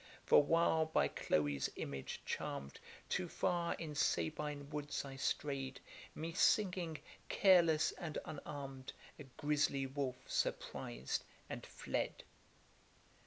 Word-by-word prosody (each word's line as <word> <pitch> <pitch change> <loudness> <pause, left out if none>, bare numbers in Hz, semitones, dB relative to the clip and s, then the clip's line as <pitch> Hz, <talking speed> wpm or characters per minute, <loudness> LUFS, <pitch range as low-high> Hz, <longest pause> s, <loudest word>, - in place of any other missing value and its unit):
For - - +8
while 160 +1 +3
by 70 - +3
Chloe's 75 -3 +1
image 70 -1 -5
charm'd, 70 0 -4 0.3
Too 180 -1 -1
far 170 0 +1
in 155 -3 -5
Sabine 150 -1 0
woods 145 -1 -3
I 135 -1 -7
stray'd; 135 -1 -1 0.4
Me 165 +1 -4
singing, 180 -3 +3 0.3
careless 170 -5 +5
and 160 -3 -5
unarm'd, 140 -3 -6 0.3
A 145 - -7
grizly 145 -2 +2
wolf 135 -1 -2
surprised, - - -2 0.3
and - - -4
fled. - - -2
145 Hz, 110 wpm, -38 LUFS, 135-160 Hz, 0.4 s, For